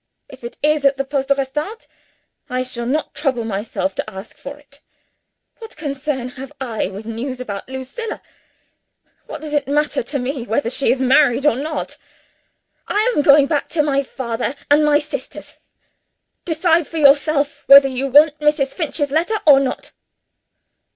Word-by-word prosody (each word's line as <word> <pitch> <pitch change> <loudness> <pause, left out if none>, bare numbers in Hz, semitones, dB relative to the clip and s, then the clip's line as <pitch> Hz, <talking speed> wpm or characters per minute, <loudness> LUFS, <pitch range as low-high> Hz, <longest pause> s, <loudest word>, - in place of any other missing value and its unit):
If 260 -2 -14
it 235 - -8
is 300 -1 +2
at 275 0 +3
the 275 - -2
Poste 275 0 -2
Restante, 295 - -2 0.6
I 255 0 -1
shall 240 -2 -4
not 300 +5 -2
trouble 265 -6 -1
myself 200 -3 -3
to 215 - -4
ask 190 +1 -10
for 280 +1 -9
it. 290 0 -20 0.8
What 450 -1 -11
concern 280 -3 -3
have 265 +1 -10
I 240 -5 -2
with 200 +3 -9
news 245 +3 -5
about 205 -3 -6
Lucilla? 265 - -6 1.1
What - - -8
does 305 -1 -7
it 290 -2 0
matter 295 +1 0
to 275 +5 -4
me 265 +1 -3
whether 235 +1 -1
she 270 - +1
is 255 - 0
married 265 0 +3
or 295 - +4
not? 305 +4 -5 0.9
I 435 +4 +1
am - - +3
going 285 0 +6
back 290 0 -1
to 310 -3 +1
my 280 -2 +1
father 255 -1 -4 0.2
and 295 +1 +5
my 300 -1 +4
sisters. 295 -3 -7 0.9
Decide 330 -1 +1
for 330 - -7
yourself 285 0 +3
whether 275 0 +9
you 265 +1 -3
want 295 +2 +5
Mrs. 300 -3 +1
Finch's 300 -4 -2
letter 340 +9 +1
or 285 -3 +7
not." 270 -2 -4
275 Hz, 165 wpm, -19 LUFS, 255-300 Hz, 1.1 s, whether